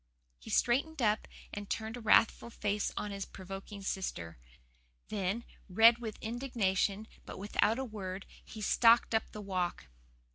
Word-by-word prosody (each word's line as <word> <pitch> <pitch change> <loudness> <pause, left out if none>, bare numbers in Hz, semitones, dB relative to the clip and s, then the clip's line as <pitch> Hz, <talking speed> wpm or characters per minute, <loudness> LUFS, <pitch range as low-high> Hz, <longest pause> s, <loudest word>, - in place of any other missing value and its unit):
He - - -11
straightened 280 +6 +2
up 215 -3 +2 0.3
and 205 -1 -6
turned 220 +1 -3
a - - -7
wrathful 225 +1 +4
face 210 -2 -1
on 210 - -2
his 195 0 -4
provoking 195 +2 -8
sister. 85 - -4 0.7
Then, 205 +2 -1 0.3
red 225 +5 +7
with 220 -3 -5
indignation, 220 -4 0 0.2
but - - -9
without 210 +3 +1
a 265 - -2
word, 195 -4 -6 0.2
he 220 - -10
stalked 230 +3 +5
up 220 - +1
the 210 - -7
walk. 180 - -2
210 Hz, 145 wpm, -33 LUFS, 195-230 Hz, 0.7 s, red